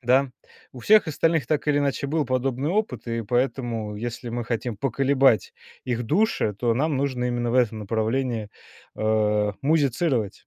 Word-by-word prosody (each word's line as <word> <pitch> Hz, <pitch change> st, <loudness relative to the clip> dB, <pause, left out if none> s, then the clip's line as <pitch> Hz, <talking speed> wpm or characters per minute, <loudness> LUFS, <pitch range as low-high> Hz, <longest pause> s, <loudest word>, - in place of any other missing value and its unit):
Да, 130 Hz, +2 st, +2 dB, 0.4 s
у 125 Hz, -, -10 dB
всех 215 Hz, -, +5 dB
остальных 160 Hz, -2 st, +1 dB
так 150 Hz, +1 st, -1 dB
или 145 Hz, -, +3 dB
иначе 140 Hz, -1 st, -1 dB
был 155 Hz, +2 st, 0 dB
подобный 130 Hz, +2 st, -1 dB
опыт, 210 Hz, -5 st, -2 dB
и 115 Hz, 0 st, -2 dB
поэтому 120 Hz, -2 st, -1 dB
если 120 Hz, +2 st, -5 dB
мы 120 Hz, 0 st, -3 dB
хотим 115 Hz, -1 st, -3 dB
поколебать 135 Hz, -1 st, +2 dB, 0.3 s
их 120 Hz, -2 st, -2 dB
души, 155 Hz, -, +1 dB
то 120 Hz, 0 st, +1 dB
нам 150 Hz, +4 st, 0 dB
нужно 130 Hz, -2 st, -1 dB
именно 120 Hz, -1 st, -1 dB
в -, -, -2 dB
этом 115 Hz, -4 st, +2 dB
направлении, 110 Hz, +2 st, -1 dB, 0.5 s
а, 105 Hz, -1 st, +1 dB
музицировать. 140 Hz, -, 0 dB
125 Hz, 155 wpm, -24 LUFS, 115-140 Hz, 0.5 s, всех